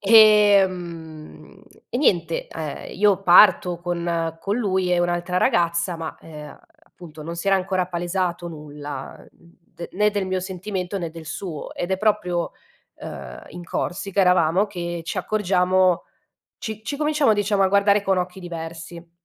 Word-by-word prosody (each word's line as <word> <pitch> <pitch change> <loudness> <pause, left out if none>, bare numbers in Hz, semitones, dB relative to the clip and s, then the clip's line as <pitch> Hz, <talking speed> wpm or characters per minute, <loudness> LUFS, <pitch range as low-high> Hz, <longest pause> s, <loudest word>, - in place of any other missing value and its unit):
Ehm, 190 -7 +3 0.3
e 245 - -2
niente, 170 - +1
uhm, 155 -2 -5
io 200 0 +2
parto 180 -1 +6
con 170 -2 -2
con 200 +3 -1
lui 190 -5 0
e 175 - +3
un'altra 175 +1 -1
ragazza, 170 0 +1
ma, 165 -1 -6
uhm, 150 -2 -11 0.3
appunto, 160 - -13
non 165 +2 -6
si 170 - -6
era 195 - +5
ancora 185 -1 -1
palesato 175 0 -2
nulla, 145 -3 -8
uhm, 170 0 -20 0.2
de 170 - -7
né 210 +2 +2
del 200 -2 -2
mio 185 0 -1
sentimento, 190 0 -4
né 170 -2 -4
del 160 -1 -11
suo, 175 -2 -6
ed 175 - -4
è 190 - +2
proprio 180 -5 0 0.4
uhm, 60 0 -9
in 175 0 -9
Corsica 195 +3 -2
eravamo, 180 +1 +3
che 175 -3 -5
ci 185 - -3
accorgiamo, 185 -2 +2 0.5
ci 220 -1 -6
ci 285 +4 -4
cominciamo, 300 -6 +2
diciamo, 205 -1 +1
a 190 - +4
guardare 200 +1 +3
con 195 -2 +1
occhi 180 +1 -3
diversi. 170 0 -8
180 Hz, 155 wpm, -23 LUFS, 170-195 Hz, 0.5 s, parto